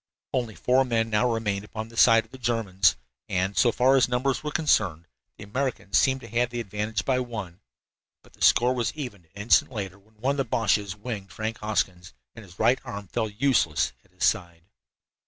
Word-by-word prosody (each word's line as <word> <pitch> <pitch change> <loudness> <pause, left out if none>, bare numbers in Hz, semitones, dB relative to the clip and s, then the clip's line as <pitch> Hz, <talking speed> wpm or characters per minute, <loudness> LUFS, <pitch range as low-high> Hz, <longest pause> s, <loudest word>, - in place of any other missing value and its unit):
Only 120 -4 -1
four 130 +2 +3
men 115 -3 0
now 120 +3 +2
remained 105 -3 -1
upon 110 +1 -7
the 115 - -15
side 115 -1 +6
of - - -27
the 130 - -11
Germans, 100 - +2 0.3
and, 95 +1 -1
so 120 - +4
far 130 +4 +3
as 130 -2 +3
numbers 125 +2 0
were 150 - -2
concerned, 95 - +1 0.3
the - - -9
Americans 125 -1 -3
seemed 130 0 +2
to 115 - -10
have 120 +1 +1
the 120 0 -4
advantage 105 -1 -3
by 130 -2 +2
one. 110 -8 -6 0.6
But - - -22
the - - -23
score 125 +1 +5
was 120 -1 -2
evened 120 - -7
an 80 - -35
instant 120 - +4
later, 100 -5 -5
when 110 +3 -28
one 125 +6 0
of - - -5
the 135 - 0
Boches 105 -4 0
"winged" 105 -3 -6
Frank 110 +2 -4
Hoskins, 90 - -2 0.2
and 115 - -11
his 90 -3 -16
right 120 +4 +3
arm 100 -7 -7
fell 110 -2 -1
useless 100 - +1
at - - -29
his 90 +1 -7
side. 85 -6 -1
110 Hz, 205 wpm, -26 LUFS, 100-125 Hz, 0.6 s, side